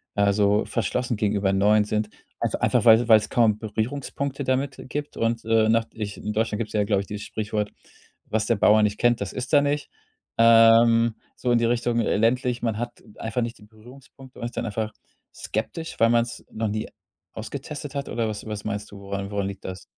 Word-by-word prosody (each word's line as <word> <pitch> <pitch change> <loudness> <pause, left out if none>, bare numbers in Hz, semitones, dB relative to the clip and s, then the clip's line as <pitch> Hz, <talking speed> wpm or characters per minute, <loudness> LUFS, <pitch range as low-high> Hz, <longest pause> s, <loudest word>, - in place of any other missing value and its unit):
äh, 100 0 +3
so 100 +1 +2
verschlossen 120 +1 -1
gegenüber 100 -2 +1
Neuen 105 +2 +3
sind. 105 0 -1 0.3
Einfa - - -1
einfach, - - +2
weil 115 +1 +6
weil's 110 -2 +5
kaum 115 -4 +3
Berührungspunkte 135 +5 -3
damit 135 +1 -1
gibt 145 +3 -5
und, 115 0 0
äh 110 -1 +3
nach 115 0 +3
ich 105 -2 -6
in 105 - -4
Deutschland 110 0 -1
gibt's 110 - -4
ja, 105 -1 +2
glaube 100 -1 +1
ich, 100 - -9
dieses 105 0 -6
Sprichwort: 105 -1 -3 0.5
„Was 110 -1 -1
der 115 -1 +1
Bauer 105 +1 +5
nicht 105 0 0
kennt, 120 -3 +2
das 100 - -4
isst 125 +3 -5
er 145 - +7
nicht“, 145 +1 -1 0.5
ähm, 115 0 +6 0.2
so 125 - -1
in 120 - +4
die 115 - +2
Richtung. 120 0 +1
Äh, 110 - 0
ländlich, 120 +2 +1
man 115 -3 -1
hat 120 +1 -6
einfach 115 +2 -2
nicht 115 0 -4
die - - -18
Berührungspunkte, 125 +4 -16
man - - -4
ist 120 - -6
dann - - -1
einfach 110 +1 -3 0.4
skeptisch, 110 +10 -4
weil 115 0 +5
man's 115 -1 0
noch 110 0 -2
nie 110 +1 -3 0.5
ausgetestet 140 +5 -7
hat 140 0 -3
oder 115 -1 -1
was 110 -1 -5
was 105 -1 -5
meinst 105 -1 -4
du, 100 - -10
woran 100 0 -5
woran 100 -1 -1
liegt 100 -1 -8
das? 95 -1 -6
110 Hz, 205 wpm, -24 LUFS, 105-120 Hz, 0.5 s, er